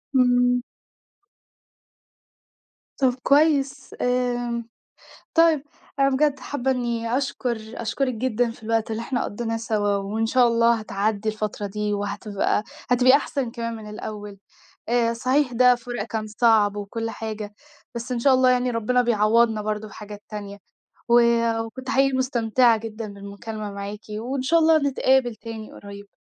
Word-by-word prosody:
امم. 245 -1 +4 2.4
طَب 260 -2 +3
كويس 280 -2 +2
آمم، 245 -2 -1 0.7
طيب 325 -4 +4 0.4
أنا 275 0 +4
بجد 280 +1 +2
حابّة 265 -2 -2
إني 235 -2 -1
أشكُر 260 -3 -2 0.3
أشكُرِِك 255 +3 -1
جدًا 240 0 0
في 225 - -13
الوقت 225 0 -1
اللي 220 +1 -3
إحنا 245 +1 -2
قضّيناه 225 +2 -3
سوا 210 -3 0
وإن 210 +3 -2
شاء 245 +1 +4
الله 230 0 +4
هتعدّي 215 -1 -2
الفترة 215 -1 -3
دي 210 +1 -2
وهتبقى 205 0 -1 0.3
هتبقي 255 +2 +6
أحسَن 275 -3 -3
كمان 230 -1 -4
من 215 -1 -9
الأول. 210 -1 -7 0.5
آآ، 235 -1 +2
صحيح 255 +3 +1
ده 250 +1 +5
فُراق 240 -3 -5
كان 220 -1 -4
صعب 215 -2 +3
وكُل 225 +3 -4
حاجة، 215 -2 -6 0.4
بس 235 +2 -5
إن 245 - -1
شاء 260 +2 +4
الله 255 0 +4
يعني 250 0 +2
ربنا 240 +2 +1
بيعوّضنا 225 -1 +3
برضه 215 0 -3
بحاجات 205 0 -10
تانية، 205 -1 -7 0.5
و 240 0 +6 0.4
وكنت 260 +3 -7
حقيقي 270 0 +3
مستمتِعة 240 -2 +3
جدًا 215 -1 -7
بالمكالمة 205 +1 -7
معاكِ 200 +1 -6 0.2
وإن 255 +4 -3
شاء 330 +6 +3
الله 320 0 +5
نتقابل 265 -4 +2
تاني 220 -1 -8
قريّب. 200 0 -12
230 Hz, 140 wpm, -23 LUFS, 215-255 Hz, 2.4 s, هتبقي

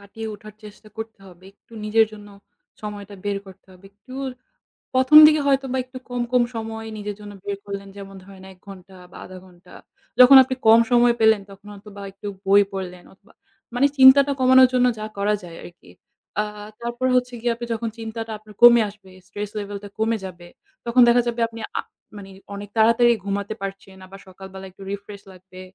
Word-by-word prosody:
কাটিয়ে 220 +2 -9
ওঠার 215 0 -13
চেষ্টা 210 +1 -14
করতে 220 -2 -8
হবে। 180 0 -17
একটু 205 - -30
নিজের 220 +1 +3
জন্য 205 -1 -12 0.5
সময়টা 205 -1 -8
বের 200 -1 -2
করতে 190 0 -16
হবে। 185 +1 -20
একটু 230 +6 -17 0.8
১ম 260 +4 +5
দিকে 305 0 +3
হয়তোবা 270 -1 0
একটু 255 0 -11
কম, 245 0 -3
কম 250 -1 +3
সময় 225 0 -6
নিজের 205 -1 -6
জন্য 205 0 -10
বের 200 -1 -4
করলেন। 200 0 -7
যেমন 195 -1 -10
ধরেন 190 -1 -15
১ 185 - -18
ঘণ্টা 190 -1 -13 0.2
বা - - -13
০.৫ 185 0 -11
ঘণ্টা। 180 -1 -19 0.5
যখন 255 +2 +9
আপনি 260 0 -4
কম 225 +1 +8
সময় 240 0 +4
পেলেন 220 -2 +4
তখন 195 +1 -16
হয়তোবা 205 0 -13
একটু 205 +2 -10 0.2
বই 200 +1 +5
পড়লেন 180 -2 -7
অথবা - - -26 0.4
মানে 275 +3 +3
চিন্তাটা 270 +2 +7
কমানোর 260 0 +6
জন্য 250 0 +3
যা 215 - -5
করা 205 +1 0
যায় 170 -1 -11
আরকি। 175 - -15 0.5
আ - - -1 0.4
তারপর 240 +2 -4
হচ্ছে 250 0 0
গিয়ে 240 0 0
আপনি 240 0 -7
যখন 225 0 -4
চিন্তাটা 225 0 -7
আপনার 215 0 -17
কমে 240 -1 +8
আসবে, 200 -2 -18 0.2
stress 205 0 -7
level 205 0 -6
টা 205 - -9
কমে 225 0 0
যাবে, 175 -2 -11 0.4
তখন 240 +1 +3
দেখা 240 +1 +4
যাবে 235 0 -3
আপনি 230 0 -12 0.2
আ - - -1 0.4
মানে 195 -1 -11 0.3
অনেক 205 0 -9
তাড়াতাড়ি 230 +2 +4
ঘুমাতে 200 +1 -3
পারছেন 195 -1 -8
আবার 195 +1 -13
সকালবেলা 190 +1 -11
একটু 190 - -19
refresh 200 0 -8
লাগবে, 185 0 -15
210 Hz, 185 wpm, -22 LUFS, 195-235 Hz, 0.8 s, যখন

